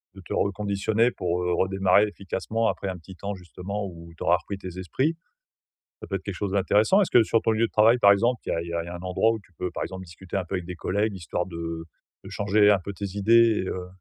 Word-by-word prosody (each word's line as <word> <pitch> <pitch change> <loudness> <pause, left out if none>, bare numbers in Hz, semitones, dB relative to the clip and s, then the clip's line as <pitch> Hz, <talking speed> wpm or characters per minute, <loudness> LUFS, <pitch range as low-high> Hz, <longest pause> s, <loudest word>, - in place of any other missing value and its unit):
de 95 - -11
te - - -5
reconditionner 105 +4 +1
pour, 90 -2 -2
heu, 90 0 0
redémarrer 95 +2 +3
efficacement 110 +3 -2
après 100 - -3
un 95 - -5
petit 90 +2 -13
temps 100 +2 -5
justement 95 +3 -6
où 85 -1 -11
tu - - -6
auras 85 +1 +4
repris 100 +1 -7
tes 95 -1 -8
esprits. 135 - 0 0.9
Ça - - -8
peut 95 - -4
être 95 - -7
quelque 100 - -5
chose 100 -2 -3
d'intéressant. 105 - +3
Est-ce 195 - +1
que 120 - +6
sur 115 +1 +1
ton - - +2
lieu 115 +1 +2
de - - -16
travail, 115 +3 +5
par 100 -3 +7
exemple, 120 +4 +1
il - - -2
y - - +1
a 85 - -1
il 85 - -8
y - - -5
a 85 - 0
il - - -10
y - - -8
a 90 - -6
un 85 - -8
endroit 95 +5 +2
où 110 - -4
tu 90 - -25
peux, 90 - -2
par - - -4
exemple, 95 0 -7
discuter 90 +3 -8
un 95 - -1
peu 90 - -6
avec 90 - -4
des 90 0 -6
collègues, 105 +2 -1
histoire 90 0 -3
de, 85 -2 -8
heu, 85 0 -5 0.4
de - - -9
changer 105 +1 +3
un 100 - +5
peu 100 +2 -7
tes 100 +1 -5
idées 115 +1 +4
et - - -3
heu 90 -1 -4
95 Hz, 285 wpm, -25 LUFS, 90-105 Hz, 0.9 s, par